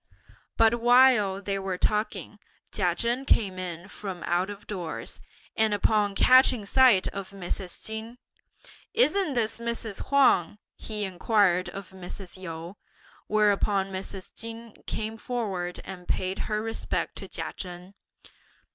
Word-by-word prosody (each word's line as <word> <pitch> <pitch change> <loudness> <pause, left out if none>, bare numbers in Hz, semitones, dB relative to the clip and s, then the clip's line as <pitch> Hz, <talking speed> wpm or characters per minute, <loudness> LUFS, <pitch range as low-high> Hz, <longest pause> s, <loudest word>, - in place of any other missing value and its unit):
But 230 +1 +4
while 240 -5 +5
they 195 -1 -1
were 190 -1 -3
talking, 210 +1 -1 0.3
Chia 180 -4 +1
Chen 235 +6 -1
came 195 -8 +2
in 175 -1 -5
from 195 -3 -6
out 180 +3 +1
of 205 0 -8
doors, 180 -6 -5 0.3
and 220 -1 +2
upon 205 0 +2
catching 255 -3 +5
sight 240 -4 +5
of 195 -1 -6
Mrs. 185 -1 -4
Chin; 220 +2 -5 0.8
"Isn't 400 - +3
this 230 -1 0
Mrs. 235 -3 -3
Huang?" 255 -9 +4 0.2
he 215 -1 -5
inquired 190 -1 +2
of 195 -2 -8
Mrs. 190 0 -8
Yu; 170 0 -7 0.5
whereupon 205 -2 +2
Mrs. 190 0 -6
Chin 230 0 -6
came 220 +1 -3
forward 195 -8 -3
and 180 -2 -9
paid 185 +1 -1
her 215 0 0
respects 225 0 -3
to - - -8
Chia - - -5
Chen. 180 +1 -8
205 Hz, 130 wpm, -27 LUFS, 185-225 Hz, 0.8 s, while